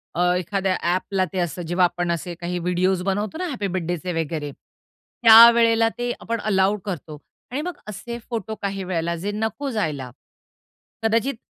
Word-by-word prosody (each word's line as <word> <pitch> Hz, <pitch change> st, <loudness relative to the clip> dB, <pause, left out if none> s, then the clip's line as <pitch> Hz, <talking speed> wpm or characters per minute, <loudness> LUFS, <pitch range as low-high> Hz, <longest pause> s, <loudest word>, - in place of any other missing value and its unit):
अ, -, -, -3 dB, 0.2 s
एखाद्या 190 Hz, 0 st, -1 dB
ॲपला 185 Hz, +2 st, 0 dB
ते 190 Hz, -, -1 dB
असतं. 175 Hz, 0 st, -2 dB
जेव्हा 175 Hz, +2 st, +2 dB
आपण 175 Hz, 0 st, -1 dB
असे 170 Hz, +1 st, -3 dB
काही 175 Hz, +1 st, -2 dB
व्हिडिओज 180 Hz, +1 st, +1 dB
बनवतो 205 Hz, +8 st, -2 dB
ना 365 Hz, -, -2 dB
हॅपी 245 Hz, -, -3 dB
बर्थडेचे 175 Hz, 0 st, -2 dB
वगैरे 150 Hz, -2 st, -4 dB, 0.7 s
त्यावेळेला 230 Hz, 0 st, +8 dB
ते 245 Hz, 0 st, -1 dB
आपण 230 Hz, 0 st, -3 dB
अलाऊ 200 Hz, -1 st, +2 dB
करतो 160 Hz, -6 st, -5 dB, 0.3 s
आणि 270 Hz, +4 st, -2 dB
मग 355 Hz, +2 st, -5 dB
असे 225 Hz, +3 st, -6 dB
फोटो 225 Hz, -2 st, -4 dB
काही 195 Hz, -1 st, -3 dB
वेळेला 170 Hz, -2 st, -2 dB
जे 195 Hz, +5 st, -3 dB
नको 220 Hz, +6 st, -2 dB
जायला. 150 Hz, -, -2 dB, 0.9 s
कदाचित 230 Hz, +5 st, +1 dB
190 Hz, 155 wpm, -23 LUFS, 175-225 Hz, 0.9 s, त्यावेळेला